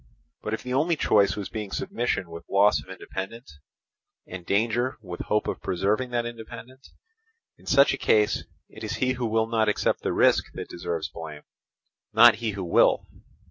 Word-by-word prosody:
But 110 - -2
if - - -11
the 125 - -4
only 160 +6 +2
choice 100 - +3
was 100 -2 -4
between 105 -3 -5
submission 95 -5 -2
with 85 0 -10
loss 100 +1 +4
of - - -17
independence, 95 -2 -8 0.7
and 90 -1 -8
danger 115 +7 0
with 90 -5 -8
the - - -5
hope 105 0 0
of - - -3
preserving 105 +8 0
that 120 -1 -1
independence, 120 +3 -10 0.7
in - - -19
such 140 0 +5
a - - -2
case 105 -1 +3 0.2
it 110 - -12
is 110 0 -3
he 130 +2 0
who 125 -2 -2
will 110 0 +1
not 110 -1 +1
accept 105 - 0
the - - -1
risk - - +3
that - - -6
deserves 85 -2 -4
blame, 80 -2 -9 0.7
not 115 +2 +8
he 115 -2 -2
who 95 -1 -4
will. 85 - +3
110 Hz, 180 wpm, -26 LUFS, 95-120 Hz, 0.7 s, not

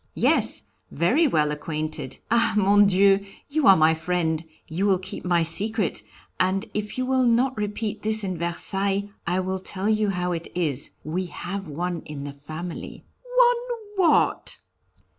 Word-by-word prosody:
"Yes, - - +2 0.3
very 250 - +2
well 150 - +1
acquainted. 150 -2 -4
Ah! 230 -2 +3
Mon 205 0 +5
Dieu! 195 +1 +4 0.3
You 305 +1 +1
are 195 - +8
my 160 +1 +5
friend, 160 -1 -1 0.2
you 180 +6 -1
will 195 -2 +4
keep 185 +1 -7
my 175 -2 +2
secret, 205 +5 +1 0.4
and 190 +3 +1
if 210 +2 -4
you 255 - 0
will 260 -1 +2
not 250 +3 +2
repeat 210 0 -3
this 215 0 0
in 185 -2 -2
Versailles 195 +4 +1 0.2
I 180 +2 +1
will 190 0 -3
tell 190 +1 -4
you 215 -1 +2
how 180 -2 -1
it 170 -1 -4
is 150 -6 0
we 180 +4 -3
have 195 +3 -6
one 170 +3 -3
in 145 -2 -7
the 140 0 -6
family." 155 +5 -8 0.3
"One 480 -4 +1
what?" - - +1
190 Hz, 160 wpm, -24 LUFS, 165-215 Hz, 0.4 s, are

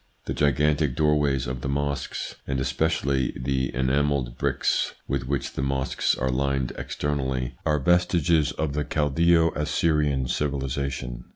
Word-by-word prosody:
The - - -2
gigantic 75 -1 +2
door 75 +1 +3
ways 70 -2 +1
of 65 0 -4
the 70 - -3
mosques, 70 0 -2
and 65 -1 -1
especially 70 -1 0
the 65 +1 -1
enamelled 65 -1 +1
bricks - - 0
with 65 -2 -2
which 70 -1 -2
the - - -3
mosques 70 0 0
are 65 +1 -1
lined 70 0 0
externally, 65 -3 -2
are 75 -1 +3
vestiges 85 0 +3
of 75 -2 -2
the 75 +1 0
Chaldseo 80 +3 +3
Assyrian 75 -3 +1
civilisation. 70 -3 -2
70 Hz, 135 wpm, -25 LUFS, 65-75 Hz, -, door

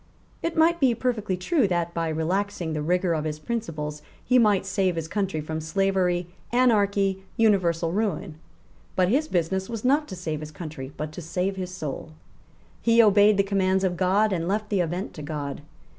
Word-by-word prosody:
It 335 0 -3
might 335 +2 +4
be 255 -4 +3
perfectly 215 -7 -1
true 240 - +2
that, 175 -2 -1
by 165 -1 -1
relaxing 175 +2 -1
the 155 - -2
rigour 180 +3 +1
of 155 -2 -1
his 155 -1 -3
principles, 155 -6 -4 0.2
he 250 0 +4
might 210 -4 +3
save 190 -2 0
his 165 -1 -3
country 195 -4 -2
from 155 +1 -4
slavery, 180 +1 +1 0.3
anarchy, 200 -6 +2
universal 175 -7 +2
ruin. 195 -5 -2 0.6
But 185 -1 +3
his 290 +7 +2
business 190 - -1
was 230 0 -5
not 290 +4 +3
to 190 - -7
save 160 -4 -4
his 155 0 -7
country, 150 -3 -7
but 155 0 -4
to 165 - -8
save 180 +4 -2
his 185 -1 -5
soul. 155 -3 -6 0.7
He 230 0 +3
obeyed 210 -1 +6
the 200 - +4
commands 190 -1 +1
of 185 -2 +1
God, 195 +4 +2
and 170 -2 -1
left 210 +2 -1
the 200 - +1
event 175 +3 -3
to 155 - -8
God. 145 -2 -5
185 Hz, 185 wpm, -25 LUFS, 165-210 Hz, 0.7 s, obeyed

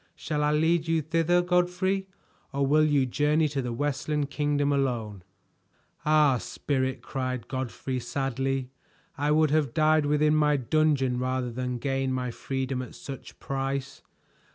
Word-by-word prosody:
Shall 150 -2 -2
I 150 - +2
lead 160 +2 +2
you 165 -1 +1
thither, 165 +3 +2
Godfrey, 180 +2 +1 0.4
or 140 0 0
will 155 +3 +4
you 145 -3 +3
journey 150 +5 +2
to 140 -1 -2
the 125 -1 -3
Westland 145 +2 -1
Kingdom 145 -1 +1
alone?" 120 -8 -1 0.9
"Ah, 150 -4 +4
Spirit!" 130 0 -2
cried 130 -2 -3
Godfrey 130 0 -3
sadly, 135 +1 -2 0.4
"I 145 +1 -1
would 155 -1 +3
have 150 -5 +1
died 155 -1 +3
within 150 +1 +3
my 150 -1 +3
dungeon 135 -2 +1
rather 130 -1 -1
than 125 +1 -3
gain 135 +1 -1
my 125 -1 -2
freedom 130 +1 -3
at 125 - -9
such 135 -2 -9
price. 135 0 -3
140 Hz, 145 wpm, -27 LUFS, 130-155 Hz, 0.9 s, will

